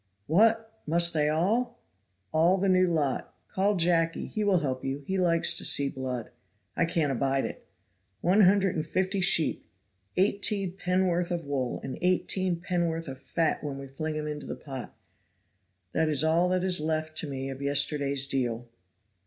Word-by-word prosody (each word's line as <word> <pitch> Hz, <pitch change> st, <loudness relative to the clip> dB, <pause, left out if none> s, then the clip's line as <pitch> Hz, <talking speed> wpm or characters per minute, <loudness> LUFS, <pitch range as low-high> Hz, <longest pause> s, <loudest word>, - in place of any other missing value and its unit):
"What! 225 Hz, -, +2 dB
must 170 Hz, +2 st, +4 dB
they 150 Hz, -1 st, +2 dB
all 215 Hz, +11 st, 0 dB, 0.3 s
" 95 Hz, 0 st, -47 dB
"All 165 Hz, +4 st, +3 dB
the 195 Hz, +1 st, 0 dB
new 185 Hz, -1 st, +4 dB
lot. 150 Hz, -6 st, -1 dB
Call 200 Hz, +2 st, +1 dB
Jacky, 165 Hz, -2 st, +1 dB
he 215 Hz, -, -3 dB
will 195 Hz, -4 st, +3 dB
help 130 Hz, -3 st, -3 dB
you; 135 Hz, +2 st, -4 dB
he 190 Hz, +3 st, -1 dB
likes 170 Hz, -1 st, +3 dB
to 170 Hz, -, -4 dB
see 140 Hz, -1 st, +2 dB
blood. 130 Hz, -3 st, -5 dB, 0.4 s
I 170 Hz, -, +2 dB
can't 165 Hz, -4 st, 0 dB
abide 135 Hz, +1 st, 0 dB
it. -, -, -8 dB, 0.5 s
One 185 Hz, -, +3 dB
hundred 195 Hz, -1 st, +4 dB
and 155 Hz, -, -1 dB
fifty 185 Hz, +4 st, -1 dB
sheep; 165 Hz, -3 st, +3 dB, 0.5 s
eighteen 195 Hz, -1 st, +1 dB
pennorth 180 Hz, -2 st, 0 dB
of 170 Hz, -3 st, -3 dB
wool, 135 Hz, -3 st, -2 dB
and 135 Hz, -, -6 dB
eighteen 180 Hz, 0 st, 0 dB
pennorth 170 Hz, -2 st, -2 dB
of 135 Hz, -1 st, -7 dB
fat 165 Hz, +1 st, -1 dB
when 140 Hz, -2 st, -4 dB
we 140 Hz, -, -7 dB
fling 155 Hz, +3 st, -4 dB
'em 150 Hz, -, -3 dB
into 150 Hz, -1 st, -5 dB
the -, -, -4 dB
pot 135 Hz, -4 st, -9 dB, 0.9 s
that 160 Hz, -1 st, +1 dB
is 150 Hz, -1 st, +2 dB
all 165 Hz, +3 st, +3 dB
that 185 Hz, 0 st, 0 dB
is 180 Hz, -4 st, +3 dB
left 155 Hz, 0 st, -2 dB
to 155 Hz, -, -3 dB
me 135 Hz, -1 st, -4 dB
of 135 Hz, +1 st, -8 dB
yesterday's 140 Hz, -1 st, +1 dB
deal." 120 Hz, -3 st, -2 dB
165 Hz, 175 wpm, -28 LUFS, 140-185 Hz, 0.9 s, must